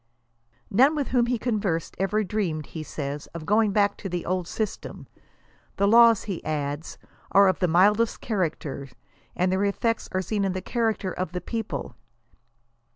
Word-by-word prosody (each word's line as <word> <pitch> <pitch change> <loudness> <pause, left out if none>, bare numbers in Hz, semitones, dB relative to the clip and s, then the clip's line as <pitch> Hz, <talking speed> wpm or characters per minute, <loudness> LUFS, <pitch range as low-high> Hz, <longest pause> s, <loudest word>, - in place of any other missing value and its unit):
None 265 +9 +5
with 290 -3 -2
whom 245 -2 +2
he 245 0 +1
conversed, 205 -8 -1
ever 205 +3 +1
dreamed 180 -7 -2
he 160 - -7
says, 145 -1 -5
of 160 -2 -6
going 210 +2 +3
back 205 0 +2
to 195 - -6
the 175 -1 -3
old 180 -1 -1
system. 215 +1 -4 0.7
The 200 - +3
laws, 230 0 +6
he 195 -5 -5
adds, 145 0 -3 0.4
are 200 0 +7
of 185 - +1
the 180 - +2
mildest 205 +7 +3
character, 160 - -3 0.5
and 180 +1 +1
their 190 +1 +1
effects 225 +3 0
are 185 0 -1
seen 205 +3 -1
in 190 -1 0
the 185 - -3
character 225 -5 -1
of 180 -2 -4
the 180 - -2
people. 225 -2 -4
195 Hz, 165 wpm, -25 LUFS, 175-220 Hz, 0.7 s, are